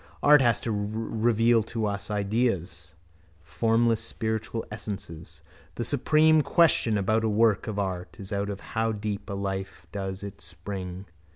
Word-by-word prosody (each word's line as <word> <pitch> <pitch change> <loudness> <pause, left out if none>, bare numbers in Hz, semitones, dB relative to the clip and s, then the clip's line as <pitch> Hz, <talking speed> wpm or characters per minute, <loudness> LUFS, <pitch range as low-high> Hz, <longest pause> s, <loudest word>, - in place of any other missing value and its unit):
Art 150 -1 +7
has 120 -3 +3
to 115 - -2
reveal 110 +2 +1
to 110 0 -3
us 100 -1 -3
ideas, 100 -5 -1 0.5
formless 115 +5 +1
spiritual 110 0 -3
essences. 100 -5 -7 0.3
The - - -2
supreme 155 0 +4
question 140 -6 +3
about 110 +3 +1
a 110 - +2
work 110 0 +2
of 110 -2 -4
art 95 -3 -3
is 100 +1 -6
out 100 0 -1
of 100 -1 -5
how 115 0 +1
deep 105 0 -4
a - - -3
life 95 -1 -4
does 95 -1 -4
it 100 -5 -8
spring. 90 +2 -6
105 Hz, 150 wpm, -27 LUFS, 95-115 Hz, 0.5 s, Art